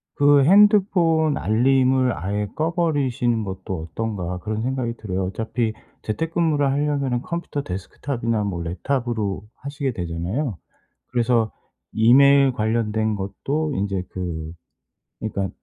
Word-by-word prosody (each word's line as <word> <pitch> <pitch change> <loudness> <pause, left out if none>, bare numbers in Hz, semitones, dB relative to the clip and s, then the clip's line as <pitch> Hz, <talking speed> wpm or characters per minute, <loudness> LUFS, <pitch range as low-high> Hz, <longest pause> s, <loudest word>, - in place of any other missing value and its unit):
그 145 -1 +5
'핸드폰 180 -4 +4
알림을 130 +2 +2
아예 100 +3 -2
꺼버리시는 145 -8 0
것도 95 -3 -5
어떤가?' 90 -2 -3
그런 110 +3 -3
생각이 125 -2 -2
들어요. 95 -3 -3
어차피 110 +3 -2 0.3
재택근무를 160 +3 0
하려면은 140 -3 0
컴퓨터 170 -2 -4
데스크탑이나 115 +4 -3
뭐 90 -4 -3
랩탑으로 110 +2 -2
하시게 140 -1 -4
되잖아요. 90 - -3 0.5
그래서 120 -2 +2 0.4
이메일 135 +4 +6
관련된 110 -1 0
것도 140 +10 -2
인제 100 -2 -1
그 80 -4 -5 0.7
그러니까 100 -3 -2
120 Hz, 300 characters per minute, -22 LUFS, 100-140 Hz, 0.7 s, 이메일